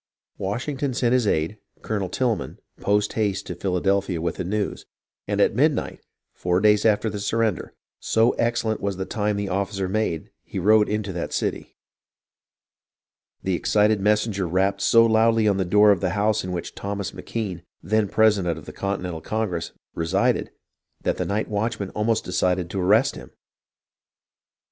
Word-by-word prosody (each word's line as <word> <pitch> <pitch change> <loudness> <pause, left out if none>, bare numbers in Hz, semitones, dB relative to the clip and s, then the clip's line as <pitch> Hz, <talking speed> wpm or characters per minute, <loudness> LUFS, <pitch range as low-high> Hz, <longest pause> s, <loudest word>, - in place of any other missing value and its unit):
Washington 130 +7 -2
sent 120 -1 +2
his 125 -4 +2
aide, 80 +5 0 0.2
Colonel 100 -4 -2
Tilghman, 120 +2 -1 0.2
post 105 +1 +1
haste 105 -3 -1
to - - -5
Philadelphia 95 0 0
with 85 +1 -2
the - - -2
news, 100 +3 -3 0.4
and - - -1
at - - +4
midnight, - - +1 0.3
four 90 0 0
days 105 +1 +4
after 110 +1 +2
the 105 -1 -3
surrender, 110 -2 -1 0.2
so 115 +2 +3
excellent 115 -2 -1
was 100 -2 -2
the 95 - -3
time 105 -1 -1
the 100 0 -2
officer 95 0 -2
made, 95 -5 -2
he - - -8
rode 105 +3 +4
into 105 -2 -2
that 85 - -4
city. - - -3 1.7
The 95 - 0
excited 105 +3 +2
messenger 105 -2 +1
rapped 95 +3 +1
so 115 +3 +6
loudly 115 0 +3
on 100 -2 +3
the 95 - 0
door 105 +3 +5
of 95 -4 +1
the 95 - +1
house 105 +1 +1
in 90 - -4
which 90 -2 -4
Thomas 100 -1 -4
M'Kean, 100 -7 -4 0.2
then 105 +4 +1
president 100 -6 +3
of 80 - -10
the - - -9
Continental 90 -4 -3
Congress, 90 -7 -2 0.2
re 80 - -3
sided 100 +8 +1 0.5
that - - 0
the - - -1
night 105 +2 -1
watchman 105 -1 -2
almost 110 +1 0
decided 90 -1 0
to 95 - -2
arrest 110 +9 +4
him. - - -10
100 Hz, 165 wpm, -24 LUFS, 95-110 Hz, 1.7 s, so